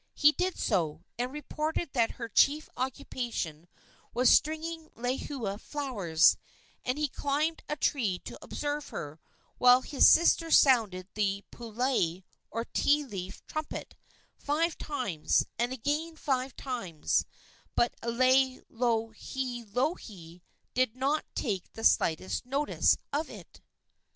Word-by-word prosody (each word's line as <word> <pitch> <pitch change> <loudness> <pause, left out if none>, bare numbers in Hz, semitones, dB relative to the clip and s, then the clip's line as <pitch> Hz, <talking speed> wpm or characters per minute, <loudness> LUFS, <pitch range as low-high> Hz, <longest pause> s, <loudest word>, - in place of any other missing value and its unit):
He 295 - +6
did 365 +4 -1
so, 160 -2 0 0.2
and 250 +1 -1
reported 300 +2 -3
that 230 -3 +2
her 230 - -6
chief 285 +7 +3
occupation 240 - -4 0.5
was 250 0 +5
stringing 315 +1 +1
lehua 245 -3 -3
flowers; 205 - +2 0.5
and 255 +3 -1
he 300 0 +1
climbed 295 +4 -1
a 300 - 0
tree 225 -12 0
to - - -7
observe 290 0 -3
her, 150 0 -6 0.4
while 250 +1 +7
his 280 - +5
sister 330 0 +5
sounded 220 - +4
the 200 -1 0
pulai, 230 -7 -1 0.3
or 230 +1 -3
ti 295 +4 +2
leaf 195 -5 -7
trumpet, 310 0 -5 0.4
five 315 +3 0
times, 250 - 0
and 240 +1 +1
again 295 +6 -2
five 265 -4 -1
times; 195 - -1 0.5
but 240 - +2
Laielohelohe 240 - -1 0.3
did 255 -2 +1
not 275 +4 0
take 195 -8 -2
the 225 - -8
slightest 170 -1 +2
notice 280 +3 +2 0.2
of 305 +3 -1
it. - - -12
255 Hz, 115 wpm, -30 LUFS, 210-290 Hz, 0.5 s, while